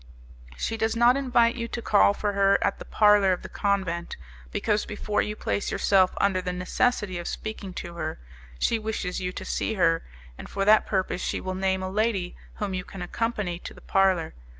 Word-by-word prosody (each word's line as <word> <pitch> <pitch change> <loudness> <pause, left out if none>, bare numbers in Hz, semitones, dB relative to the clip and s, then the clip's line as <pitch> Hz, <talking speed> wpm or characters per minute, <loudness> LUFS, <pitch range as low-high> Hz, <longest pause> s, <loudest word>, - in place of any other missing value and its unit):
She 225 - -2
does 220 +1 0
not 240 +2 +5
invite 240 -4 +3
you 230 -1 -4
to 235 - -5
call 100 - +4
for 205 -1 -1
her 200 0 +4
at - - 0
the - - -8
parlour 210 -3 +4
of 180 - -5
the - - -8
convent, 190 -4 -1 0.3
because, 210 - 0
before 210 0 -1
you 210 - -3
place 205 - -2
yourself 190 -2 +3
under 195 -2 +2
the 180 - -3
necessity 185 +1 0
of 175 - -5
speaking 215 -3 -5
to 170 - -6
her, 155 -2 -4 0.4
she 230 - +1
wishes 210 -5 -3
you 180 0 -2
to - - -6
see 220 - -1
her, 165 -3 +3 0.4
and - - -9
for 195 0 -1
that 215 +1 +5
purpose 185 -2 -1
she - - -2
will 185 - -4
name 190 0 0
a - - -2
lady 205 -3 0 0.2
whom 205 -2 -3
you 185 -1 -2
can 185 0 -8
accompany 205 -3 -2
to - - -9
the - - -13
parlour. 190 -4 +2
195 Hz, 200 wpm, -26 LUFS, 180-215 Hz, 0.4 s, not